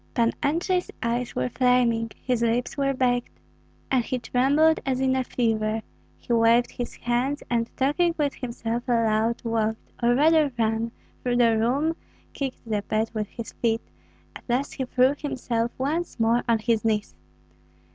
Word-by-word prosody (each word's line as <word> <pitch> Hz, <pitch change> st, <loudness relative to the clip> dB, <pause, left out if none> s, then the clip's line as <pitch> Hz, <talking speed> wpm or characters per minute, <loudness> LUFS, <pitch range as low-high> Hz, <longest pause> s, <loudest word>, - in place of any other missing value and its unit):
Pan 235 Hz, -1 st, +3 dB
Andrei's 345 Hz, +5 st, 0 dB
eyes 235 Hz, +1 st, -1 dB
were 125 Hz, 0 st, 0 dB
flaming, 240 Hz, -, +2 dB, 0.2 s
his 250 Hz, -2 st, +1 dB
lips 235 Hz, +1 st, 0 dB
were 275 Hz, -1 st, +1 dB
baked, 245 Hz, -2 st, 0 dB, 0.5 s
and 260 Hz, -3 st, +3 dB
he 255 Hz, -, -2 dB
trembled 280 Hz, +7 st, +3 dB
as 260 Hz, -1 st, -1 dB
in 260 Hz, 0 st, +2 dB
a 260 Hz, -, +1 dB
fever; 220 Hz, -3 st, 0 dB, 0.3 s
he 240 Hz, -, -3 dB
waved 230 Hz, +1 st, +4 dB
his 245 Hz, -, -5 dB
hands, 250 Hz, +4 st, -1 dB
and 230 Hz, -1 st, +1 dB
talking 330 Hz, +6 st, +2 dB
with 290 Hz, -3 st, 0 dB
himself 235 Hz, -1 st, -3 dB
aloud, 230 Hz, -1 st, +1 dB
walked, 225 Hz, -1 st, -2 dB
or 240 Hz, +1 st, +3 dB
rather 305 Hz, +1 st, +4 dB
ran, 225 Hz, 0 st, 0 dB, 0.3 s
through 245 Hz, -1 st, 0 dB
the 235 Hz, -2 st, +4 dB
room, 270 Hz, +9 st, +1 dB, 0.4 s
kicked 270 Hz, -4 st, -5 dB
the 210 Hz, -2 st, 0 dB
bed 215 Hz, +2 st, -1 dB
with 215 Hz, -2 st, -2 dB
his 230 Hz, +1 st, -8 dB
feet; 225 Hz, -1 st, -1 dB, 0.4 s
at -, -, -10 dB
last 255 Hz, +4 st, 0 dB
he 265 Hz, -, -3 dB
threw 255 Hz, +2 st, +3 dB
himself 245 Hz, -5 st, -2 dB
once 300 Hz, +3 st, -2 dB
more 230 Hz, +2 st, +3 dB
on 230 Hz, -, +4 dB
his 220 Hz, 0 st, 0 dB
knees. 215 Hz, -2 st, 0 dB
240 Hz, 160 wpm, -25 LUFS, 230-265 Hz, 0.5 s, waved